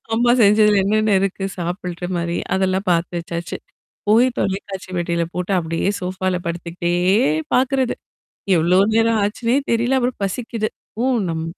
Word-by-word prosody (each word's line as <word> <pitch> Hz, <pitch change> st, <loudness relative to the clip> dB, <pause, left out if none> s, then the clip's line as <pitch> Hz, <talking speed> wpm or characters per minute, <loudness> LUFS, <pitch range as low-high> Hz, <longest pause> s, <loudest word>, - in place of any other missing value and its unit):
அம்மா 240 Hz, +1 st, +3 dB
செஞ்சதுல 210 Hz, 0 st, +5 dB
என்னென்ன 215 Hz, +1 st, +2 dB
இருக்கு? 195 Hz, 0 st, -2 dB
சாப்புடுற 180 Hz, 0 st, -4 dB
மாரி? 170 Hz, 0 st, -2 dB, 0.2 s
அதெல்லாம் 190 Hz, +1 st, 0 dB
பார்த்து 170 Hz, +1 st, 0 dB
வச்சாச்சு. 170 Hz, 0 st, -5 dB, 0.5 s
போய் 230 Hz, +4 st, +5 dB
தொலைக்காட்சி 190 Hz, -1 st, -3 dB
பெட்டியில 170 Hz, -1 st, 0 dB
போட்டு 180 Hz, +2 st, -3 dB
அப்படியே 165 Hz, +2 st, -2 dB
சோஃபால 185 Hz, 0 st, -2 dB
படுத்துக்கிட்டே 170 Hz, 0 st, -3 dB, 0.6 s
பாார்க்குறது. 260 Hz, 0 st, +2 dB, 0.6 s
எவ்ளோ 175 Hz, +3 st, +3 dB, 0.2 s
நேரம் 225 Hz, -1 st, +3 dB
ஆச்சுன்னே 230 Hz, +5 st, 0 dB
தெரியல. 240 Hz, +3 st, +2 dB
அப்புறம் 250 Hz, -2 st, -2 dB
பசிக்குது. 220 Hz, +2 st, -2 dB, 0.3 s
ஓ! -, -, +1 dB, 0.3 s
நம் 160 Hz, -1 st, -2 dB
190 Hz, 130 wpm, -20 LUFS, 175-220 Hz, 0.6 s, செஞ்சதுல